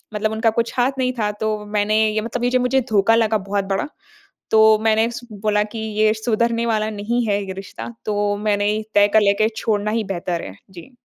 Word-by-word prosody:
मतलब 215 +1 0
उनका 220 +1 +1
कुछ 230 - -1
हाथ 250 +2 +3
नहीं 255 0 0
था। 210 -1 0
तो 215 0 0
मैंने 210 +1 0 0.2
ये 215 - 0
मतलब 235 +2 -4
ये - - +2
जो 255 - +3
मुझे 260 +1 +2
धोखा 215 +2 +3
लगा 220 -1 +2
बहुत 200 -1 0
बड़ा। 295 - -1 0.6
तो 220 0 +6
मैंने 220 +1 +3
स 235 - -7
बोला 210 0 0
कि 230 - -6 0.2
ये 215 0 +4
सुधरने 230 +1 0
वाला 215 -1 0
नहीं 225 +4 -2
है 205 -1 0
ये 190 - -5
रिश्ता। 195 0 -8 0.2
तो 205 -1 0
मैंने 205 -1 0
ही 215 +1 -2
तय 205 0 +5
कर 220 - +7
लिया 200 -1 +4
कि 215 - +4
छोड़ना 210 -1 -1
ही 225 -1 0
बेहतर 175 -2 -3
है। 95 - -9 0.2
जी। 190 +8 -13
215 Hz, 220 wpm, -20 LUFS, 205-230 Hz, 0.6 s, कर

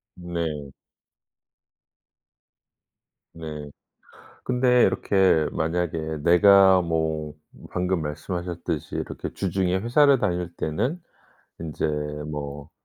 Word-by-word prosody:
네. 85 -5 -4 2.6
네. 75 -3 -7 0.7
근데 125 -1 +3
이렇게 95 -6 +3
만약에 80 -1 -2
내가 95 +2 +6
뭐 80 -2 -2 0.3
방금 90 -1 -1
말씀하셨듯이 85 0 -4
이렇게 - - -5
주중에 95 -1 0
회사를 135 +7 +4
다닐 90 -4 -1
때는 120 - -2 0.6
인제 80 -3 -3 0.4
뭐 70 -1 -6
85 Hz, 175 characters per minute, -24 LUFS, 80-95 Hz, 2.6 s, 내가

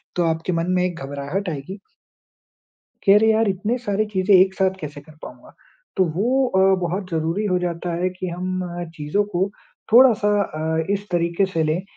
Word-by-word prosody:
तो 175 - +1
आपके 165 +2 -1
मन 165 +1 -1
में 180 0 +2
एक 175 -2 -4
घबराहट 145 +8 -4
आएगी। 160 +7 -6 1.2
कि 195 - +5
अरे! 220 +2 +5
यार 220 -1 +2
इतने 205 +6 -1
सारे 215 -3 -1
चीज़ें 190 +1 +4
एक 190 +1 +5
साथ 190 -1 0
कैसे 150 -3 -7
कर 155 0 -18
पाऊँगा। - - -12 0.4
तो 190 - +5
वो 255 +8 +2
अ, 190 -5 +1 0.2
बहुत 180 +2 -3
ज़रूरी 165 +6 -1
हो 185 -2 +1
जाता 175 0 -3
है 185 - +1
कि 185 0 -6
हम 185 +1 -3 0.3
चीज़ों 150 +7 0
को 190 +3 +1 0.4
थोड़ा-सा 230 -4 +6
अ, 160 -1 -2
इस 200 +1 -4
तरीक़े 170 +2 +1
से 165 - +1
लें 155 +4 0
185 Hz, 180 wpm, -22 LUFS, 165-200 Hz, 1.2 s, थोड़ा-सा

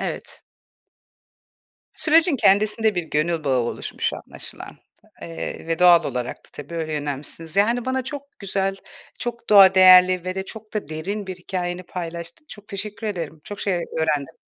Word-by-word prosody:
Evet. - - -6 1.5
Sürecin 320 0 +3
kendisinde 215 0 +3
bir 175 - -1
gönül 155 +1 -1
bağı 135 -2 +2
oluşmuş 120 - -3
anlaşılan, - - -9 0.5
eee, 85 - -6
ve 165 -1 -1
doğal 175 -1 +6
olarak 125 0 -3
da - - -19
tabii 160 +3 -9
öyle 160 -1 -3
yönelmişsiniz. 150 +4 -5
Yani, 230 +4 +2
bana 260 0 -1
çok 280 +1 -8
güzel, 195 -1 -1 0.4
çok 235 -1 -5
doğa 195 -2 +8
değerli 185 -1 +7
ve 185 0 -3
de 190 - -3
çok 220 +1 -11
da 210 -8 -3
derin 190 +6 -4
bir 185 - -6
hikâyeni 180 0 -4
paylaştın. 170 - -7
Çok 210 0 -12
teşekkür 210 +2 -5
ederim, 165 -6 -4
çok 205 - -8
şey 195 -3 0 0.2
öğrendim. 150 -3 -1
185 Hz, 155 wpm, -22 LUFS, 165-210 Hz, 1.5 s, doğa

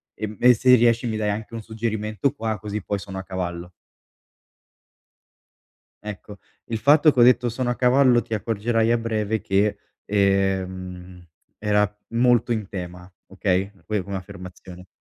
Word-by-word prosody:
e 110 - -4
m 110 +4 +4
se 125 +2 +4
riesci 120 0 +3
mi 110 -1 -2
dai 105 -1 -1
anche 105 +2 -4
un 115 - -5
suggerimento 110 +2 -2
qua, 110 -5 -3
così 105 +2 -5
poi 100 - -2
sono 95 0 -7
a - - -6
cavallo. 90 -2 -5 2.3
Ecco, 105 -1 -9 0.3
il 115 -1 -4
fatto 145 +6 +5
che - - -1
ho - - +7
detto: 125 0 +5
"Sono 120 +1 -2
a 120 - 0
cavallo", 125 -1 +4
ti 115 - -7
accorgerai 115 +2 0
a 120 - +3
breve 110 -1 -2
che, 100 +2 +1 0.3
ehm, 95 -2 -1 0.4
era 105 -1 +1
molto 120 0 +2
in 110 -4 -1
tema, 90 -1 -8 0.2
okay, 95 0 -1
poi 105 -2 -1
come 100 +2 -6
affermazione. 90 -1 -10
105 Hz, 150 wpm, -23 LUFS, 95-115 Hz, 2.3 s, ho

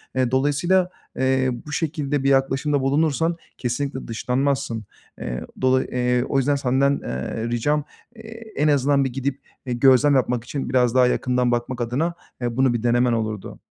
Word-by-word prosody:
Eee, 130 -2 +1
dolayısıyla, 145 +8 +2 0.3
eee, 130 0 +2 0.2
bu 150 - -8
şekilde 145 -3 -1
bir 140 - +3
yaklaşımda 135 +1 +2
bulunursan 155 +4 +1 0.2
kesinlikle 130 +2 -3
dışlanmazsın. 125 -1 -1 0.3
Eee, - - -4 0.2
dolayı, 130 0 +2
eee, 125 0 +1
o 135 - -1
yüzden 140 +2 +2
senden, 140 +1 +1
eee, 90 - -4
ricam, 145 +6 0 0.3
eee, 225 0 -11
en 150 - +2
azından 140 -1 +3
bir 130 -2 -2
gidip, 135 +1 -3 0.2
eee, 125 - -2
gözlem 135 +3 +5
yapmak 125 -2 +1
için 135 +1 -4
biraz 125 -2 +2
daha 125 -1 +5
yakından 125 -1 +1
bakmak 120 +1 -2
adına, 135 +9 -1 0.3
eee, 120 -1 -2
bunu 130 -2 +3
bir 120 - -2
denemen 120 0 +3
olurdu. 110 -3 -3
130 Hz, 160 wpm, -22 LUFS, 125-145 Hz, 0.3 s, gözlem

